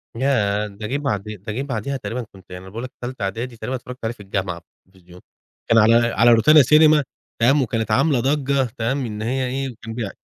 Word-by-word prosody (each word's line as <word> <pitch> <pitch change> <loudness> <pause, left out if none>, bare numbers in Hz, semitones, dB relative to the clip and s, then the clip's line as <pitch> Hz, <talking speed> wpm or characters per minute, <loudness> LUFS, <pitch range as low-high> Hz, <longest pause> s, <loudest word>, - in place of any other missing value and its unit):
ياه! 105 -5 +1
ده 105 +1 -8
جه 135 +4 -1
بعد 105 -9 -2
ده 105 0 -7
جه 130 - -3
بعديها 135 0 -3
تقريبًا 125 0 -5
كنت 95 -3 -17
يعني 90 0 -8
أنا 95 - -11
باقول 115 +5 -7
لك 130 - -7
تالتة 120 -4 -5
إعدادي 115 +5 -4
تقريبًا 120 +4 -4
اتفرجت 125 0 -8
عليه 110 +1 -2
في 120 - -27
الجامعة 95 -3 -3
في - - -31 0.2
التلفزيون، 90 -1 -18 0.5
كان 115 - +4
على 115 +1 +6
على 115 0 +4
روتانا 150 +7 +6
سينما، 150 +2 +5 0.4
تمام، 135 +5 +4
وكانت 115 -2 -2
عاملة 135 +3 +3
ضجة، 140 +1 +1
تمام، 130 +4 -1
إن 105 -1 -6
هي 130 +3 -1
إيه 130 -1 -4
كان 115 -1 -7
بي 110 -4 -4
115 Hz, 215 wpm, -21 LUFS, 105-130 Hz, 0.5 s, على